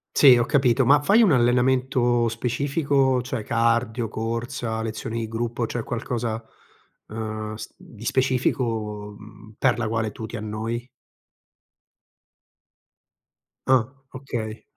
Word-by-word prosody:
Sì, 135 -4 +8
ho 120 0 +2
capito, 130 -2 +3
ma 140 +4 +5
fai 215 +9 +5
un 200 -8 +5
allenamento 125 -1 +2
specifico? 135 +2 +1
Cioè 125 -2 -4
cardio, 115 +1 +1
corsa, 115 0 -3
lezioni 110 +1 -4
di 115 - -3
gruppo, 115 +1 -2
cioè 120 0 -3
qualcosa, 115 -1 -3 0.7
uhm, 110 -1 -5
s 110 0 -8
di 110 -1 -14
specifico, 115 -5 -1
mhmm, 110 +1 -14
per 130 -3 +3
la 120 - -1
quale 110 -1 -1
tu 110 - -7
ti 115 - -8
annoi? 115 +3 -4 2.8
Ah, 130 -2 +3 0.2
okay. 115 -4 -5
115 Hz, 120 wpm, -24 LUFS, 110-130 Hz, 2.8 s, Sì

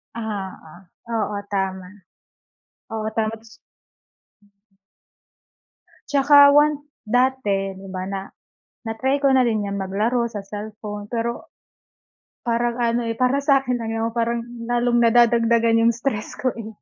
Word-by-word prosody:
Oo, 200 -7 -6 0.4
oo, 210 -2 -1 0.2
tama. 190 -2 -2 1.0
Oo, 220 -1 -4
tama. 220 -1 0
Tapos 220 0 -18 2.5
Tsaka 285 0 +7
once 295 0 +4 0.2
dati, 215 -6 0
di 195 0 -11
ba, 185 0 -3
na 195 -1 -3 0.7
na-try 260 +5 0
ko 280 - +3
na 260 - +5
rin 215 -3 0
yang 200 0 -3
maglaro 215 +6 0
sa 210 -2 -5
cellphone. 210 0 -8
Pero 235 0 -3 0.9
parang 235 0 0
ano 235 0 +1
eh, 230 - -3
para 255 +3 +2
sa'kin 270 -3 +2
lang 225 -1 -4
yun, 225 0 -1
parang 235 0 0
lalong 240 0 -1
nadadagdagan 230 -1 +4
yung 235 - +5
stress 235 -3 -3
ko 255 - 0
eh. 225 -2 -7
230 Hz, 125 wpm, -22 LUFS, 210-245 Hz, 2.5 s, Tsaka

